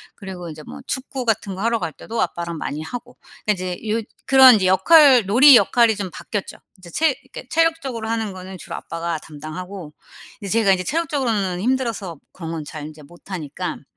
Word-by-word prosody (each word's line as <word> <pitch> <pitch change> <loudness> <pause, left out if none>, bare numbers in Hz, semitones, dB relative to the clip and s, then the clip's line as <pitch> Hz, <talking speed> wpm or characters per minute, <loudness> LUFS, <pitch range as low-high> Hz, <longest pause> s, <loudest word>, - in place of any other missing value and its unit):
그리고 185 -4 -8
인제 155 0 -9
뭐 75 -1 -9
축구 260 -1 -4
같은 210 -4 -1
거 190 - -7
하러 230 0 +1
갈 165 -4 -3
때도 225 +9 -5
아빠랑 170 -1 -3
많이 150 +2 -4
하고. 240 +8 -8 0.3
그러니까 210 - +3
이제 185 +4 -5
요 225 +1 0 0.3
그런 265 -2 +8
이제 190 -3 +1
역할 250 - +6
놀이 255 +8 +8
역할이 235 -2 +4
좀 195 -4 -5
바뀌었죠. 205 -3 -5 0.2
이제 180 -2 -14
체 310 - +2
그러니까 260 -1 -11
체력적으로 320 -9 0
하는 225 -2 -2
거는 185 0 -9
주로 - - -7
아빠가 170 0 -4
담당하고 155 +3 -8 0.5
이제 200 - -5
제가 200 -3 +4
인제 185 -1 -1
체력적으로는 245 - -1
힘들어서 230 - -2
그런 165 -3 -7
건 160 -2 -4
잘 150 0 -8
인제 155 0 -11
못하니깐. 170 0 -7
195 Hz, 415 characters per minute, -21 LUFS, 170-240 Hz, 0.5 s, 그런